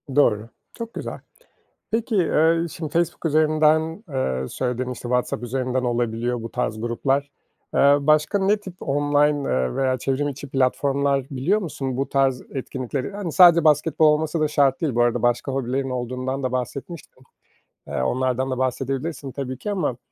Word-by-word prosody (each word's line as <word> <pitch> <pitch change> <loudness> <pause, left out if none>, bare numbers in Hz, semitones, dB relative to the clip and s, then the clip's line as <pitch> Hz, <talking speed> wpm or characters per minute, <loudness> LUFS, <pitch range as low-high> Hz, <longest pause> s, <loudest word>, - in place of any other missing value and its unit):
Doğru. 115 -6 +3 0.2
Çok 230 -1 -7
güzel. - - -6 0.7
Peki, 225 0 -1
eee, 165 -1 +3
şimdi 155 -3 -6
Facebook 170 0 -1
üzerinden, 155 +3 +2
eee, 65 - -2
söyledin 125 0 -2
işte 125 - -7
WhatsApp 125 0 0
üzerinden 130 +1 -1
olabiliyor 120 0 -1
bu 115 - -6
tarz 110 -3 -2
gruplar. 135 +4 -1 0.4
Eee, 140 +1 +6
başka 155 +5 +3
ne 200 +2 +3
tip 195 -3 -10
online 145 0 +1
eee, 65 -1 0
veya 130 -1 +1
çevrim 135 +2 -1
içi 140 0 -7
platformlar 135 +1 +1
biliyor 155 +11 +1
musun? 135 -7 -4
Bu 135 +1 -1
tarz 135 -2 +1
etkinlikleri, 130 - -4
hani, 200 -5 -4
sadece 170 -2 +7
basketbol 155 +1 +4
olması 155 +1 +2
da 155 - +2
şart 140 -3 +2
değil 150 -7 -1
bu 120 - +3
arada. 120 -1 +1
Başka 120 +3 +1
hobilerin 135 0 -2
olduğundan 130 +2 -3
da 130 - -2
bahsetmiştin. 130 +2 -6 0.6
Eee, - - -2
onlardan 130 - 0
da 130 - -2
bahsedebilirsin 135 +3 -2
tabii 130 -1 -5
ki 210 - -4
ama, 180 -11 -1
135 Hz, 160 wpm, -23 LUFS, 125-155 Hz, 0.7 s, sadece